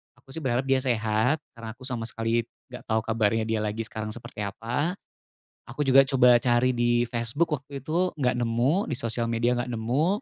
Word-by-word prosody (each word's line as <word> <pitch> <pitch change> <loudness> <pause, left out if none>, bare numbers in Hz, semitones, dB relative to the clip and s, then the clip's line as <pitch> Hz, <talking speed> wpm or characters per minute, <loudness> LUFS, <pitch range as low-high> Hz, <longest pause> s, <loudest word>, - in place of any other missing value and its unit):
aku, 120 +2 -19
sih, 160 - -5
berharap 130 -3 0
dia 135 0 +2
sehat 120 +3 0
karena 115 -2 -9
aku 130 - -16
sama 120 -3 -3
sekali 115 +1 -1 0.2
nggak 125 - -10
tau 110 -1 +1
kabarnya 110 -1 +1
dia 110 0 -1
lagi 110 +1 -2
sekarang 110 -1 -5
seperti 120 - -10
apa, 125 - -2 0.7
aku 125 +5 -5
juga 135 0 +7
coba 125 -3 +6
cari 120 +1 +2
di 120 0 +2
Facebook 120 +8 0
waktu 140 0 -9
itu 175 +5 0
nggak 130 -4 +1
nemu, 120 - +1
di - - -2
sosial 115 -1 -2
media 115 +1 +1
nggak 120 - -2
nemu, 120 +8 0
120 Hz, 190 wpm, -26 LUFS, 115-135 Hz, 0.7 s, juga